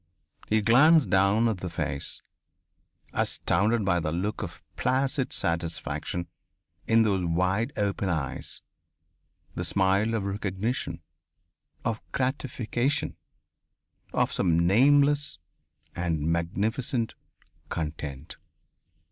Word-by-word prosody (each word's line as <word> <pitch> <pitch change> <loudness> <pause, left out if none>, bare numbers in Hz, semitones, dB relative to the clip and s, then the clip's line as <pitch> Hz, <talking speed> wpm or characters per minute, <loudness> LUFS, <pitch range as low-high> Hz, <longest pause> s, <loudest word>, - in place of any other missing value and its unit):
He 110 0 +2
glanced 140 +7 +6
down 100 +4 +4
at 110 -4 0
the 90 - -4
face, 75 -4 -3 0.9
astounded 110 +1 +1
by 90 -2 +2
the 80 -2 -2
look 95 +6 -2
of - - -7
placid 130 +1 +1
satisfaction 85 +1 -2 0.6
in 115 0 +5
those 100 -4 +1
wide 95 +6 +1
open 100 -2 0
eyes, 75 -7 -3 0.9
the - - -3
smile 100 +4 +2
of 110 - -1
recognition, 100 +3 -3 0.8
of 115 0 -1
gratification, 130 +1 -1 1.0
of - - +1
some 85 -2 +2
nameless 140 - +4 0.6
and 85 -3 -1
magnificent 110 - -1 0.6
content.... 75 -3 -5
100 Hz, 95 wpm, -27 LUFS, 85-120 Hz, 1.0 s, glanced